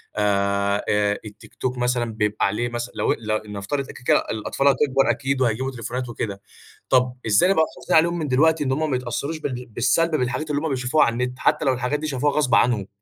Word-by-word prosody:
آآ، 100 Hz, -1 st, +1 dB
آآ 105 Hz, 0 st, +1 dB
التيك 105 Hz, 0 st, -13 dB
توك 125 Hz, 0 st, -3 dB
مثلًا 120 Hz, -2 st, 0 dB
بيبقى 105 Hz, -1 st, 0 dB
عليه 110 Hz, +5 st, -1 dB
مثلًا 120 Hz, +1 st, -5 dB
لو -, -, +1 dB
ل 110 Hz, -1 st, -3 dB
نفترض 105 Hz, +8 st, -3 dB
كده، -, -, -10 dB
كده -, -, +6 dB
الأطفال 110 Hz, +5 st, -1 dB
هتكبر 135 Hz, 0 st, +3 dB
أكيد، 135 Hz, -1 st, 0 dB
وهيجيبوا 130 Hz, +2 st, 0 dB
تليفونات 125 Hz, +1 st, -5 dB
وكده. 100 Hz, -4 st, -5 dB, 0.5 s
طب 125 Hz, -1 st, +3 dB
إزاي 105 Hz, -, +4 dB
نبقى 175 Hz, -5 st, +4 dB
محافظين 160 Hz, -, 0 dB
عليهم 170 Hz, +2 st, +2 dB
من 155 Hz, -, -2 dB
دلوقتي، 155 Hz, +4 st, +3 dB
إن 130 Hz, -, -1 dB
هم 155 Hz, +3 st, 0 dB
ما -, -, +2 dB
يتأثّروش 130 Hz, +5 st, -3 dB
بال 125 Hz, -4 st, -4 dB
بالسَّلب 135 Hz, +9 st, +1 dB
بالحاجات 130 Hz, +3 st, -2 dB
اللي 145 Hz, 0 st, 0 dB
هم 160 Hz, -, -2 dB
بيشوفوها 130 Hz, +2 st, +2 dB
على 115 Hz, -, 0 dB
النت، 125 Hz, +1 st, -3 dB
حتّى 150 Hz, 0 st, +1 dB
لو 130 Hz, -, +3 dB
الحاجات 125 Hz, +4 st, -1 dB
دي 155 Hz, -, -3 dB
شافوها 145 Hz, 0 st, 0 dB
غصب 145 Hz, -4 st, +2 dB
عنهم؟ 110 Hz, -5 st, +2 dB
125 Hz, 205 wpm, -23 LUFS, 110-140 Hz, 0.5 s, كده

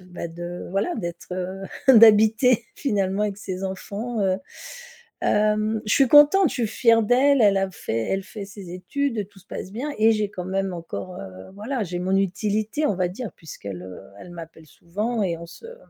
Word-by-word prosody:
bah 180 Hz, -2 st, -7 dB
de 175 Hz, +1 st, -7 dB
voilà 200 Hz, -, 0 dB
d'être, 170 Hz, -1 st, -6 dB
heu, 185 Hz, +1 st, -4 dB, 0.3 s
d'habiter 220 Hz, +2 st, +6 dB
finalement 200 Hz, -6 st, -1 dB
avec 205 Hz, -2 st, -1 dB
ses 190 Hz, -2 st, -6 dB
enfants. 210 Hz, +4 st, -4 dB
Heu, 190 Hz, -1 st, +2 dB, 0.9 s
hem, 215 Hz, +1 st, +1 dB
je 210 Hz, -, +1 dB
suis 275 Hz, -, +5 dB
contente, 295 Hz, +5 st, +7 dB
je -, -, -6 dB
suis 235 Hz, -, 0 dB
fière 230 Hz, 0 st, +3 dB
d'elle, 260 Hz, +5 st, +4 dB
elle 200 Hz, -2 st, +5 dB
a 195 Hz, 0 st, +1 dB
fait 115 Hz, -9 st, -3 dB
elle 195 Hz, 0 st, 0 dB
fait 205 Hz, 0 st, -8 dB
ses 200 Hz, -3 st, -11 dB
études, 230 Hz, +3 st, -2 dB
tout 205 Hz, -, -19 dB
se 185 Hz, -, -25 dB
passe 190 Hz, -, -7 dB
bien 260 Hz, +8 st, -4 dB
et 220 Hz, +1 st, +5 dB
j'ai 215 Hz, -2 st, -1 dB
quand 180 Hz, -3 st, -6 dB
même 190 Hz, +1 st, -2 dB
encore, 175 Hz, +2 st, -7 dB
heu 95 Hz, -1 st, -10 dB
voilà, 225 Hz, +5 st, -3 dB
j'ai 175 Hz, -1 st, -4 dB
mon 185 Hz, +1 st, 0 dB
utilité, 210 Hz, -, 0 dB
on 205 Hz, -, +1 dB
va 180 Hz, -1 st, 0 dB
dire, 205 Hz, +4 st, -7 dB
puisqu'elle, 100 Hz, -, -8 dB
heu, 95 Hz, 0 st, -9 dB, 0.2 s
elle 180 Hz, -, -11 dB
m'appelle 165 Hz, -2 st, -11 dB
souvent 210 Hz, +9 st, -3 dB
et 170 Hz, -3 st, -1 dB
on 170 Hz, -, -9 dB
se, 170 Hz, -, -13 dB
hem 480 Hz, +1 st, -11 dB
200 Hz, 195 wpm, -23 LUFS, 180-225 Hz, 0.9 s, contente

